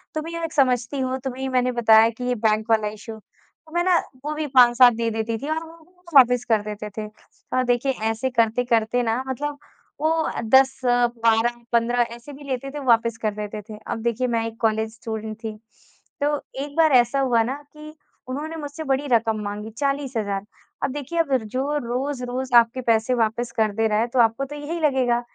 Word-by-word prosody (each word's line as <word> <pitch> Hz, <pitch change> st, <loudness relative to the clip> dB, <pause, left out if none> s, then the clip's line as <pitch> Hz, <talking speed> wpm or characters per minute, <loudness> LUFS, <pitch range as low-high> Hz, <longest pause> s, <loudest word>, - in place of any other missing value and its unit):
तुम 310 Hz, -, -2 dB
ही 335 Hz, -, -6 dB
एक 325 Hz, -, -4 dB
समझती 255 Hz, -1 st, +1 dB
हो, 260 Hz, 0 st, -1 dB
तुम्हें 265 Hz, 0 st, -6 dB
ही 265 Hz, -, -2 dB
मैंने 255 Hz, -1 st, +1 dB
बताया 225 Hz, -2 st, +5 dB
कि 235 Hz, +2 st, -8 dB
ये 250 Hz, 0 st, 0 dB
बैंक 215 Hz, +1 st, +2 dB
वाला 220 Hz, -1 st, +3 dB
इशू। 215 Hz, +1 st, -8 dB
तो 315 Hz, +8 st, -27 dB
मैं 345 Hz, -, +2 dB
ना 360 Hz, -1 st, +4 dB, 0.3 s
वो 300 Hz, -, -2 dB
भी 305 Hz, 0 st, -2 dB
5-7 250 Hz, -2 st, +6 dB
दे 230 Hz, 0 st, -1 dB
देती 225 Hz, +1 st, -2 dB
थी 280 Hz, -, -6 dB
और 320 Hz, +1 st, -1 dB
वो 335 Hz, +2 st, -17 dB
वापस 245 Hz, -2 st, +6 dB
कर 220 Hz, -2 st, +3 dB
देते 210 Hz, 0 st, -6 dB
थे। 215 Hz, -1 st, -3 dB, 0.5 s
और 255 Hz, -, +3 dB
देखिए 245 Hz, +2 st, +1 dB, 0.2 s
ऐसे 225 Hz, +4 st, -1 dB
करते-करते 235 Hz, 0 st, +1 dB
ना 230 Hz, +3 st, -1 dB
मतलब 285 Hz, +3 st, -3 dB, 0.4 s
वो 320 Hz, +1 st, +1 dB
10-12-15 240 Hz, -1 st, +2 dB
ऐसे 245 Hz, +5 st, -12 dB
भी 285 Hz, +1 st, -12 dB
लेते 275 Hz, -1 st, -4 dB
थे 295 Hz, -, -6 dB
वापस 230 Hz, -2 st, +3 dB
कर 215 Hz, -1 st, 0 dB
देते 210 Hz, 0 st, -5 dB
थे। 215 Hz, -, -8 dB
अब 225 Hz, -, -3 dB
देखिए 235 Hz, +2 st, 0 dB
मैं 230 Hz, -2 st, 0 dB
एक 225 Hz, 0 st, -10 dB
कॉलेज 220 Hz, -1 st, 0 dB
स्टूडेंट 220 Hz, -1 st, -5 dB
थी, 215 Hz, -1 st, -5 dB, 0.6 s
तो 290 Hz, 0 st, +1 dB, 0.3 s
एक 285 Hz, 0 st, -9 dB
बार 320 Hz, -2 st, +5 dB
ऐसा 245 Hz, +2 st, +4 dB
हुआ 245 Hz, -4 st, +3 dB
ना 255 Hz, +4 st, -3 dB, 0.2 s
कि 305 Hz, 0 st, -11 dB, 0.3 s
उन्होंने 295 Hz, +5 st, -5 dB
मुझसे 300 Hz, 0 st, -6 dB
बड़ी 275 Hz, 0 st, -1 dB
रकम 225 Hz, -2 st, +2 dB
माँगी 205 Hz, +1 st, -5 dB
40,000 250 Hz, -9 st, -2 dB, 0.4 s
अब 275 Hz, -, 0 dB
देखिए 295 Hz, +4 st, -4 dB
अब 280 Hz, -5 st, +2 dB
जो 265 Hz, +7 st, -2 dB
रोज़-रोज़ 250 Hz, 0 st, -3 dB
आपके 235 Hz, +2 st, +3 dB
पैसे 230 Hz, +1 st, +2 dB
वापस 235 Hz, 0 st, 0 dB
कर 220 Hz, -1 st, +2 dB
दे 225 Hz, 0 st, +2 dB
रहा 210 Hz, 0 st, +1 dB
है 230 Hz, -, +1 dB
तो 260 Hz, -, +2 dB
आपको 230 Hz, +4 st, +3 dB
तो 290 Hz, -, -8 dB
यही 295 Hz, +4 st, -5 dB
लगेगा 260 Hz, -5 st, +2 dB
245 Hz, 195 wpm, -23 LUFS, 225-275 Hz, 0.6 s, 5-7